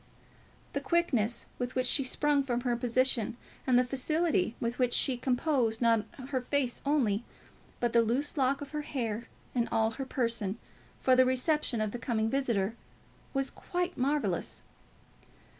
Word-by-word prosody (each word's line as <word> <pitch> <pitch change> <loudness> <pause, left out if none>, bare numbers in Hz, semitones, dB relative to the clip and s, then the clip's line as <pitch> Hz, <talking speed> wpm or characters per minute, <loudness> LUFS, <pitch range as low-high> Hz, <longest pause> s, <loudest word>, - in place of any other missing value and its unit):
The - - -1
quickness 255 -10 +1
with 245 0 -3
which 255 0 +1
she 275 - +4
sprung 290 +2 +2
from 245 -3 -1
her 245 -1 0
position, 240 -1 +1 0.3
and 250 -2 +5
the 250 - +5
facility 270 - 0
with 235 +2 -3
which 250 -1 +2
she 265 - +3
composed 245 -2 +1
not 230 -3 +3 0.2
her 260 -3 0
face 255 -1 -1
only, 240 -8 +2 0.6
but 240 -1 0
the 235 - +6
loose 250 +6 0
lock 275 -1 +1
of 285 - -7
her 300 -1 -2
hair 235 -6 -3 0.3
and 240 -2 0
all 225 0 +2
her 270 +4 -5
person, 230 -5 -1 0.4
for 260 - +4
the 255 - +6
reception 260 -1 +1
of 215 -1 -1
the 245 - -5
coming 225 -2 0
visitor, 230 -7 0 0.6
was 270 0 +1
quite 360 0 -3
marvellous. 285 +4 -1
250 Hz, 160 wpm, -30 LUFS, 230-275 Hz, 0.6 s, the